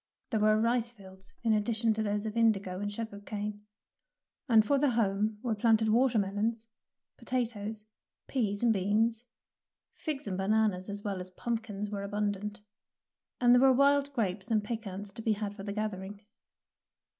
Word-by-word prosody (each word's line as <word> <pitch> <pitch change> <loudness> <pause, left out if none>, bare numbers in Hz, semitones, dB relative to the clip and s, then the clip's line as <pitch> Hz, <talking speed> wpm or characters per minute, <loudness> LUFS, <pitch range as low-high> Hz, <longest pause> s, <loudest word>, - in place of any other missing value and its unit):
There 220 - +1
were 215 0 +4
rice 235 +1 +1
fields 190 -4 -12
in 225 -2 +3
addition 225 +1 +1
to 220 - -2
those 205 0 -1
of 215 0 -4
indigo 200 -5 +2
and 205 0 -3
sugar 215 -1 -5
cane, 210 0 -5 0.8
and 220 -2 +6
for 280 +4 +2
the 290 0 +3
home 215 -2 +1
were 240 -3 0
planted 220 0 +3
watermelons, 225 -2 +1 0.5
potatoes, 220 -4 -3 0.4
peas, 210 -5 -1
and 235 -2 +5
beans; 220 +4 +1 0.7
figs 300 -4 -4
and 190 -2 -3
bananas 205 -1 +1
as 205 0 -5
well 200 -3 -2
as 180 0 -4
pumpkins 210 0 -4
were 200 -1 -3
abundant, 205 0 -3 0.8
and 245 -1 +6
there 245 - +6
were 270 0 +7
wild 280 +2 +4
grapes 200 -4 -2
and 215 -2 +2
pecans 205 -3 -5
to 225 - -7
be 220 -1 +2
had 205 -1 -4
for 200 - -8
the 200 +1 -4
gathering. 205 -1 -4
215 Hz, 160 wpm, -30 LUFS, 205-230 Hz, 0.8 s, were